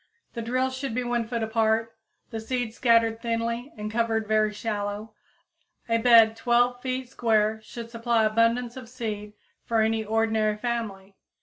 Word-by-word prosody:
The 235 Hz, -, -4 dB
drills 255 Hz, +3 st, -1 dB
should 260 Hz, -3 st, -4 dB
be 250 Hz, -, 0 dB
1 240 Hz, -2 st, -1 dB
foot 230 Hz, -1 st, -2 dB
apart, 220 Hz, 0 st, +1 dB, 0.4 s
the 225 Hz, -, -4 dB
seeds 235 Hz, 0 st, -3 dB
scattered 230 Hz, -2 st, +3 dB
thinly 235 Hz, +2 st, -2 dB
and 210 Hz, 0 st, -5 dB
covered 225 Hz, -1 st, 0 dB
very 215 Hz, 0 st, +2 dB
shallow; 210 Hz, 0 st, -4 dB, 0.7 s
a 230 Hz, 0 st, +2 dB
bed 225 Hz, -2 st, +6 dB
12 245 Hz, +1 st, +2 dB
feet 255 Hz, 0 st, -3 dB
square 220 Hz, -3 st, +1 dB
should 230 Hz, +1 st, -9 dB
supply 230 Hz, -1 st, +1 dB
abundance 230 Hz, +2 st, +1 dB
of 255 Hz, -3 st, -9 dB
seed 215 Hz, -4 st, -5 dB, 0.3 s
for 230 Hz, -2 st, +1 dB
any 220 Hz, 0 st, +1 dB
ordinary 220 Hz, -1 st, +1 dB
family. 210 Hz, -5 st, -4 dB
230 Hz, 150 wpm, -26 LUFS, 220-240 Hz, 0.7 s, bed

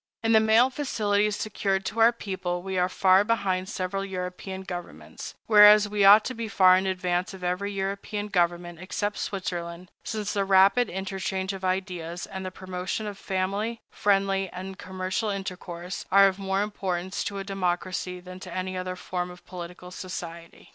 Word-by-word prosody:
In 225 Hz, -, +2 dB
the 220 Hz, -, +7 dB
mail 220 Hz, +4 st, +4 dB
facilities 210 Hz, -7 st, 0 dB
secured 195 Hz, -3 st, -1 dB
to 225 Hz, -, -3 dB
our 225 Hz, +1 st, +7 dB
people, 185 Hz, -5 st, -4 dB
we 190 Hz, 0 st, -4 dB
are 180 Hz, 0 st, +2 dB
far 190 Hz, +1 st, +4 dB
behind 195 Hz, -4 st, 0 dB
several 195 Hz, +1 st, -3 dB
European 190 Hz, 0 st, -5 dB
governments, 175 Hz, -2 st, -8 dB
whereas 210 Hz, -1 st, +8 dB
we 205 Hz, -1 st, 0 dB
ought 205 Hz, +2 st, +8 dB
to 255 Hz, -, -3 dB
be 230 Hz, -2 st, -4 dB
far 185 Hz, -3 st, +6 dB
in 190 Hz, +1 st, +1 dB
advance 180 Hz, 0 st, -1 dB
of 185 Hz, -, -12 dB
every 180 Hz, +3 st, -1 dB
European 200 Hz, +1 st, -3 dB
government 175 Hz, -3 st, 0 dB
except 205 Hz, +3 st, -3 dB
Switzerland, 175 Hz, -2 st, -4 dB
since 210 Hz, -2 st, -3 dB
the 200 Hz, -, +1 dB
rapid 195 Hz, +5 st, +5 dB
interchange 190 Hz, 0 st, -3 dB
of 190 Hz, -1 st, -8 dB
ideas, 180 Hz, -2 st, -2 dB
and 190 Hz, -1 st, -7 dB
the 185 Hz, -, -3 dB
promotion 185 Hz, +3 st, -4 dB
of 205 Hz, -1 st, -5 dB
family, 195 Hz, +4 st, -2 dB
friendly, 195 Hz, -1 st, +1 dB
and 190 Hz, +2 st, -8 dB
commercial 185 Hz, +3 st, -3 dB
intercourse, 180 Hz, -2 st, -5 dB
are 195 Hz, +1 st, +8 dB
of 190 Hz, 0 st, -2 dB
more 195 Hz, 0 st, 0 dB
importance 190 Hz, -3 st, -3 dB
to 200 Hz, -, -4 dB
a 195 Hz, -, -3 dB
democracy 185 Hz, -1 st, -2 dB
than 185 Hz, +1 st, -10 dB
to 185 Hz, -1 st, -9 dB
any 185 Hz, +1 st, -3 dB
other 185 Hz, 0 st, -3 dB
form 180 Hz, -1 st, -4 dB
of 180 Hz, 0 st, -13 dB
political 180 Hz, 0 st, -9 dB
society. 170 Hz, -2 st, -8 dB
190 Hz, 170 wpm, -26 LUFS, 180-200 Hz, -, whereas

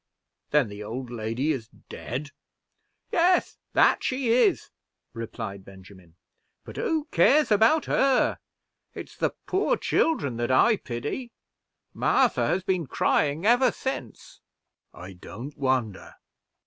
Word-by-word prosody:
"Then 150 Hz, -5 st, +3 dB
the 100 Hz, 0 st, -9 dB
old 120 Hz, +3 st, -6 dB
lady 120 Hz, +6 st, -2 dB
is 125 Hz, -7 st, -4 dB
dead?" 140 Hz, +6 st, -8 dB, 0.8 s
"Yes, 360 Hz, +1 st, +2 dB
that -, -, +4 dB
she 255 Hz, -2 st, -1 dB
is," 250 Hz, -, +2 dB, 0.4 s
replied 105 Hz, -4 st, -6 dB
Benjamin; 95 Hz, -3 st, -16 dB, 0.5 s
"but -, -, -11 dB
who 315 Hz, -2 st, -1 dB
cares 270 Hz, -, +4 dB
about 225 Hz, +9 st, +4 dB
her? 270 Hz, -2 st, +2 dB, 0.6 s
it's -, -, -9 dB
the -, -, -1 dB
poor 385 Hz, +2 st, +1 dB
children 140 Hz, -, 0 dB
that 120 Hz, 0 st, -2 dB
I 210 Hz, -, +4 dB
pity. 145 Hz, -, -5 dB, 0.6 s
Martha -, -, +2 dB
has 185 Hz, +1 st, 0 dB
been 185 Hz, -5 st, -1 dB
crying 150 Hz, +6 st, 0 dB
ever 245 Hz, +3 st, +4 dB
since." 260 Hz, -, -7 dB, 0.5 s
"I 90 Hz, +2 st, -11 dB
don't 120 Hz, +10 st, -9 dB
wonder." 130 Hz, -8 st, -2 dB
140 Hz, 120 wpm, -26 LUFS, -, 0.8 s, that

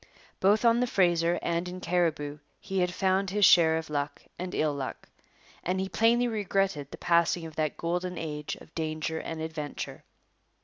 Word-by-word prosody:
Both 205 Hz, +4 st, +3 dB
on 230 Hz, 0 st, +5 dB
the 250 Hz, -, +2 dB
Fraser 175 Hz, -4 st, +2 dB
and 170 Hz, +1 st, -1 dB
in 180 Hz, +1 st, -7 dB
Cariboo 160 Hz, -5 st, 0 dB, 0.2 s
he 195 Hz, -1 st, -3 dB
had 180 Hz, 0 st, +1 dB
found 190 Hz, +1 st, +1 dB
his 205 Hz, +1 st, +4 dB
share 160 Hz, -2 st, +6 dB
of 160 Hz, 0 st, -4 dB
luck 145 Hz, -1 st, -3 dB, 0.2 s
and 180 Hz, 0 st, -4 dB
ill 155 Hz, -1 st, +1 dB
luck; 135 Hz, -2 st, -5 dB, 0.6 s
and 185 Hz, +2 st, 0 dB
he 190 Hz, 0 st, -2 dB
plainly 235 Hz, +3 st, +3 dB
regretted 195 Hz, -, -1 dB
the -, -, -9 dB
passing 170 Hz, -1 st, +2 dB
of 160 Hz, -1 st, -9 dB
that 155 Hz, -2 st, -1 dB
golden 180 Hz, +2 st, -2 dB
age 150 Hz, -2 st, -4 dB
of 160 Hz, -, -16 dB
danger 160 Hz, 0 st, -2 dB
and 165 Hz, -, -5 dB
adventure. 160 Hz, -2 st, -5 dB
170 Hz, 175 wpm, -28 LUFS, 160-190 Hz, 0.6 s, share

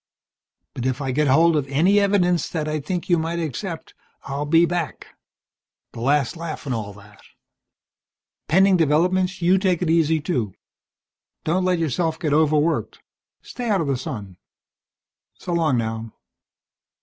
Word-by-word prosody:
But 125 Hz, 0 st, -3 dB
if 130 Hz, +1 st, -1 dB
I 135 Hz, -2 st, -2 dB
get 150 Hz, +3 st, +1 dB
hold 160 Hz, +5 st, +4 dB
of 145 Hz, -3 st, 0 dB
any 170 Hz, +9 st, +3 dB
evidence 180 Hz, -5 st, +2 dB
that 155 Hz, -3 st, -3 dB
I 155 Hz, 0 st, -1 dB
think 175 Hz, +4 st, -4 dB
you 175 Hz, -2 st, +3 dB
might 165 Hz, +1 st, -2 dB
accept, 165 Hz, +2 st, -5 dB, 0.3 s
I'll 140 Hz, +2 st, -4 dB
be 165 Hz, +3 st, +5 dB
back. 170 Hz, -3 st, -4 dB, 0.8 s
The -, -, -10 dB
last 140 Hz, +2 st, +1 dB
laugh 165 Hz, -2 st, -6 dB
and 135 Hz, -, -2 dB
all 105 Hz, -3 st, -4 dB
that. 105 Hz, +1 st, -17 dB, 1.3 s
Pending 190 Hz, +3 st, +4 dB
developments 180 Hz, +4 st, +1 dB
you 185 Hz, +2 st, +4 dB
take 185 Hz, -2 st, +1 dB
it 165 Hz, -, +1 dB
easy, 160 Hz, -1 st, +3 dB
too. 125 Hz, -, -2 dB, 0.9 s
Don't 180 Hz, +4 st, 0 dB
let 180 Hz, -1 st, +2 dB
yourself 160 Hz, +1 st, -1 dB
get 155 Hz, -4 st, -1 dB
overworked. 155 Hz, +1 st, +1 dB, 0.4 s
Stay 245 Hz, -2 st, -5 dB
out 200 Hz, -3 st, +2 dB
of -, -, -1 dB
the 140 Hz, -1 st, 0 dB
sun. 105 Hz, -7 st, -7 dB, 1.0 s
So 175 Hz, -, -5 dB
long 160 Hz, -6 st, +2 dB
now." 110 Hz, -1 st, -3 dB
160 Hz, 150 wpm, -22 LUFS, 140-175 Hz, 1.3 s, be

